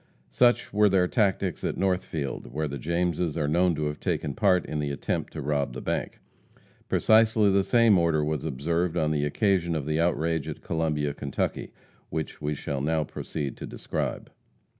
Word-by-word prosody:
Such 120 - +3
were 105 0 +5
their 95 -2 +3
tactics 95 -4 0
at - - -2
Northfield, 90 -6 -2
where 75 +1 -2
the 70 -1 -5
Jameses 85 +1 -1
are 75 -3 0
known 85 +3 +2
to 75 0 -2
have 75 0 -3
taken 70 - -2
part 95 -2 +3
in 75 - -3
the 75 -1 -1
attempt 70 - -3
to - - -5
rob 70 -2 -1
the 65 - -5
bank. - - -3 0.7
Precisely 110 -2 +4
the 100 0 +3
same 115 -3 +4
order 80 -3 +2
was 75 -2 -2
observed 80 +4 -1
on 80 -2 +1
the 75 -1 +1
occasion 85 +1 +1
of 75 -3 -2
the 75 +1 0
outrage 80 -2 0
at 75 - -7
Columbia, 75 -3 -1
Kentucky, 70 -1 -3 0.4
which 80 -1 -4
we 75 0 -1
shall 70 -1 -4
now 80 +2 +1
proceed 70 -2 -5
to - - -7
describe. - - -4
80 Hz, 180 wpm, -27 LUFS, 75-90 Hz, 0.7 s, were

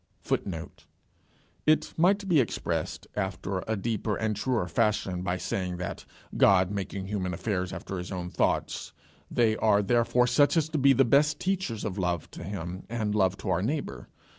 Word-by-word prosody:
[Footnote: 85 -4 -4 0.8
It 155 - +3
might 195 +4 +3
be 170 -5 +4
expressed 125 - -2
after 95 -1 -2
a 110 - 0
deeper 110 0 -1
and 110 -1 -1
truer 110 -2 0
fashion 95 0 0
by 90 0 -1
saying 90 0 -3
that, 90 - -5 0.3
God 95 -1 +5
making 100 -1 -4
human 95 -3 -2
affairs 95 -1 -2
after 95 - -5
his 90 - -6
own 90 -2 -4
thoughts, - - -1 0.4
they 115 -3 +2
are 105 -2 +3
therefore 120 +3 +3
such 145 +6 +3
as 160 -1 +2
to 155 -1 -1
be 140 0 +6
the 135 +1 +4
best 150 +5 +3
teachers 185 - -2
of 100 -2 -3
love 90 -3 -1
to - - -8
him 90 -1 -5
and 110 -3 -1
love 95 -2 +2
to - - -5
our 85 - +1
neighbour. 110 - -3
105 Hz, 170 wpm, -28 LUFS, 95-120 Hz, 0.8 s, be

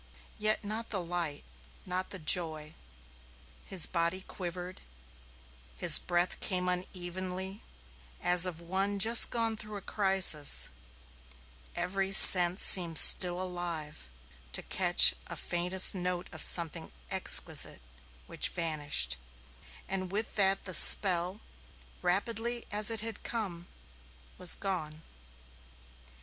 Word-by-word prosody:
Yet 215 0 -2
not 215 +3 -9
the 200 - -6
light, 170 -4 -8 0.4
not 185 +1 -7
the 190 - -9
joy. 155 -2 -1 0.9
His 190 -4 +1
body 170 +2 -5
quivered; 180 -1 -11 1.0
his - - +5
breath 175 0 -5
came 180 -1 -5
unevenly, 185 +2 -9 0.6
as 180 0 +2
of 170 -3 -10
one 190 +4 -6
just 225 +4 +4
gone 230 -1 -5
through 215 -1 -11
a - - -12
crisis; 190 -8 +1 1.1
every 190 +2 -6
sense 180 -2 +9
seemed 170 -4 +3
still 180 -1 +5
alive 170 - -10 0.4
to - - -4
catch - - +2
a - - -11
faintest 180 +2 -2
note 180 -1 -7
of 160 - -13
something 165 - +1 0.2
exquisite - - -3 0.4
which - - -4
vanished; 145 - -4 0.7
and 185 -1 -7
with 215 +3 -6
that 195 -1 -2
the 185 - -9
spell, 185 +2 +8 0.6
rapidly 230 +6 -5
as 210 +1 -1
it 225 -2 -4
had 225 -1 -9
come, 185 -7 -9 0.7
was 180 - -3
gone. 160 -5 -8
180 Hz, 110 wpm, -27 LUFS, 175-195 Hz, 1.1 s, sense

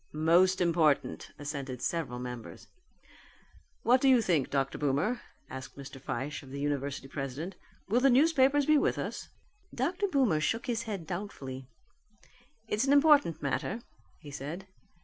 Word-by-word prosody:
"Most 175 +5 +4
important," 165 -4 +2
assented 140 -3 -5
several 145 -5 -2
members. 125 -2 -7 1.2
"What 250 +2 +4
do 270 - +5
you 255 -2 +6
think, 170 - +1
Dr. 135 -1 -1
Boomer?" 150 - 0 0.3
asked 130 +1 -9
Mr. 135 -1 -9
Fyshe 135 +4 -4
of 135 - -13
the 140 +1 -6
university 140 -1 -2
president, 140 +6 -5 0.3
"will 225 +5 +3
the 275 +2 +5
newspapers 280 +1 +4
be 305 0 +5
with - - +1
us?" - - -5 0.4
Dr. 350 - -1
Boomer 260 - +2
shook 225 - -1
his 235 -2 -2
head 195 -6 -4
doubtfully. 140 -8 -6 1.0
"It's 220 +5 0
an 275 - +5
important 285 - +5
matter," 210 - -2 0.4
he 150 -3 -11
said. 150 +7 -6
165 Hz, 145 wpm, -30 LUFS, -, 1.2 s, you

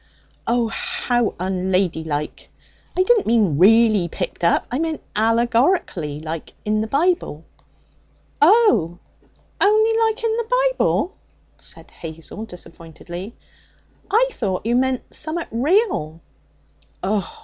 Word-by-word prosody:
'Oh! 235 0 +2
how 240 0 -1
unladylike! 180 -5 -2 0.5
I 370 - +4
didn't 445 +2 +3
mean 210 -10 +2
really 215 -1 +5
picked 170 - -5
up! 170 - +3
I 250 - -1
meant 320 -1 -2
allegorically 230 - +1
like 160 0 -6
in 215 0 +1
the 220 - -2
Bible.' 285 - 0 1.0
'Oh! 295 - +4 0.6
only 435 +2 +4
like 445 +1 -5
in 450 -1 +1
the - - +1
Bible,' 365 - 0 0.4
said - - -15
Hazel 165 +6 -8
disappointedly. 175 +2 -10 0.7
'I 485 +4 +3
thought 200 - -3
you 235 +1 +1
meant 260 0 +1
summat 325 +2 -4
real.' 245 - +1 0.8
'Oh! 200 -1 -2
225 Hz, 110 wpm, -21 LUFS, -, 1.0 s, really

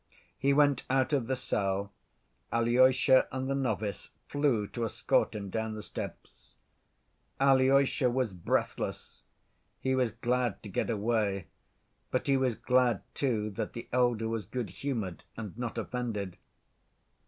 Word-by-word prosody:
He 140 +1 +3
went 145 -2 +4
out 130 +2 +2
of 130 -5 +1
the 130 - +1
cell. 100 -5 -1 0.6
Alyosha 130 +2 +5
and 130 0 -3
the 135 - 0
novice 110 -6 -2 0.2
flew 140 -7 +1
to 120 - -4
escort 110 - +1
him 100 -2 -5
down 110 0 -2
the 105 - -6
steps. - - -8 0.8
Alyosha 135 -1 +4
was 120 -4 0
breathless: 90 -2 -2 0.6
he 130 - 0
was 130 -2 +2
glad 120 -2 -1
to 105 - -7
get - - -1
away, 105 -4 0 0.6
but 130 - -1
he 140 - +3
was 130 -3 +1
glad, 125 -3 +2
too, 110 -6 0
that 105 +2 -4
the 115 - -7
elder 120 -3 +2
was 110 -4 -3
good‐humored 115 -3 -3 0.2
and 110 -4 -6
not 120 0 -4
offended. 110 -5 -3
120 Hz, 135 wpm, -30 LUFS, 105-130 Hz, 0.8 s, Alyosha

